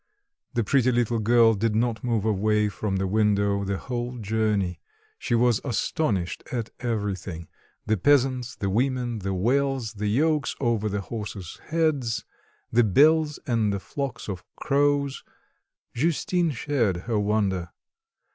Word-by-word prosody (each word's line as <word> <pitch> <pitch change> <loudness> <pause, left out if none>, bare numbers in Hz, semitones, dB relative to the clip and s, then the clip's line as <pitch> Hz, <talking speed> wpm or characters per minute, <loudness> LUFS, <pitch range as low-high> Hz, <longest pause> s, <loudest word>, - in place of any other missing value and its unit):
The 120 - +2
pretty 130 +3 +3
little 120 -1 +1
girl 115 +1 +5
did 110 +1 0
not 115 0 0
move 115 -4 0
away 105 0 +2
from 100 -1 -3
the 95 0 0
window 100 0 +2
the 100 0 -2
whole 125 +1 -4
journey; 105 -5 0 0.4
she 120 - 0
was 120 -2 +3
astonished 110 - -1
at 115 -3 -3
everything; 100 -8 -3 0.4
the 110 - +1
peasants, 130 +1 +2
the 100 -1 -2
women, 120 0 0
the 95 -1 -2
wells, 130 +3 0
the 105 0 -3
yokes 150 +7 +1
over 115 -4 0
the 100 0 -2
horses' 105 -4 -7
heads, 150 -8 0 0.5
the 120 +1 +4
bells 150 - +4
and 115 -4 +1
the 100 - -2
flocks 135 +4 -5
of 95 -4 -5
crows. 140 -1 +1 0.7
Justine 170 +5 +1
shared 125 - 0
her 115 -3 0
wonder. 100 -4 0
115 Hz, 135 wpm, -25 LUFS, 100-130 Hz, 0.7 s, girl